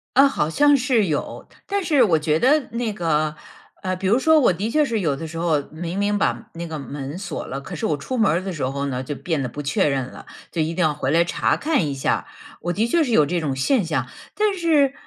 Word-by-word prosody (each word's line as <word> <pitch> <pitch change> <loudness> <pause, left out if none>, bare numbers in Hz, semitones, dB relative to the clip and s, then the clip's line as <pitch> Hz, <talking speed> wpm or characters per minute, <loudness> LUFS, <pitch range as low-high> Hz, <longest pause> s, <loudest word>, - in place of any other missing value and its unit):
呃， 275 +2 +7
好 155 - -1
像 290 - +4
是 250 -5 +2
有。 150 -3 -3 0.2
但 400 0 -1
是 295 -6 +4
我 170 -8 +3
觉 155 +1 +1
得 290 - +3
那 235 -1 -2
个， 155 -6 0 0.5
呃 185 -1 -1
比 185 +1 -3
如 215 +5 +4
说 315 +4 +5
我 240 -10 +4
的 200 +6 -3
确 305 +3 +3
是 230 -6 -1
有 160 -8 0
的 160 +4 -6
时 165 +1 -8
候 165 -3 +1
明 170 +3 -5
明 205 0 +1
把 215 +2 -1
那 170 0 -6
个 160 -2 -5
门 140 +3 -6
锁 180 -5 -5
了， 135 +2 -5
可 180 +6 -8
是 155 - -3
我 150 - 0
出 255 - -4
门 215 -7 +3
儿 170 +4 +1
的 195 - -4
时 145 -7 -2
候 140 +1 -3
呢， 130 -1 -3
就 145 +3 -5
变 160 0 -2
得 130 - -2
不 145 - -6
确 145 +1 +1
认 135 -3 0
了， - - -12 0.3
就 165 - -1
一 160 +1 -1
定 180 - -2
要 155 -1 +2
回 140 -2 -2
来 165 +2 +4
查 170 - 0
看 295 - +1
一 140 - -2
下， 135 - -1 0.4
我 175 +1 -2
的 220 +6 +1
确 330 +7 +3
是 255 - -2
有 155 -9 +5
这 175 +4 -1
种 145 -5 -2
现 195 - +1
象。 160 -1 -1 0.3
但 425 -1 +2
是， 305 -6 +3
175 Hz, 280 characters per minute, -22 LUFS, 150-240 Hz, 0.5 s, 呃